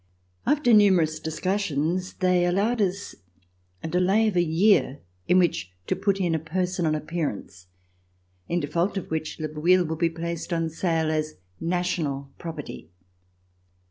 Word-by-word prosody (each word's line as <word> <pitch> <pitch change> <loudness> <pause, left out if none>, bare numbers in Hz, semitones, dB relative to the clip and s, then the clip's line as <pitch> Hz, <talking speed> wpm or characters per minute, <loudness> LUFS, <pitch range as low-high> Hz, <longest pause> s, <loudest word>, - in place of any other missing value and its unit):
After 290 -5 +3
numerous 180 -7 +4
discussions 175 +1 -1
they 180 -1 +2
allowed 205 +6 +1
us 195 0 -1 0.7
a - - -2
delay 185 +6 +2
of 200 - -5
a 175 - +4
year 170 -3 +3 0.3
in 180 - +4
which 135 - +1
to - - 0
put 195 0 0
in 175 -3 +1
a 160 - +1
personal 175 0 -1
appearance, 150 - -4 0.8
in 175 - +1
default 170 +7 -1
of 190 - -5
which 160 0 -3
Le 155 - -2
Bouilh 170 +4 +2
would 160 0 -4
be 170 -1 +3
placed 170 +1 -5
on 165 -1 -1
sale 165 -1 0
as 155 0 -2 0.2
national 165 -6 -2
property. 165 -4 -7
170 Hz, 140 wpm, -25 LUFS, 155-185 Hz, 0.8 s, numerous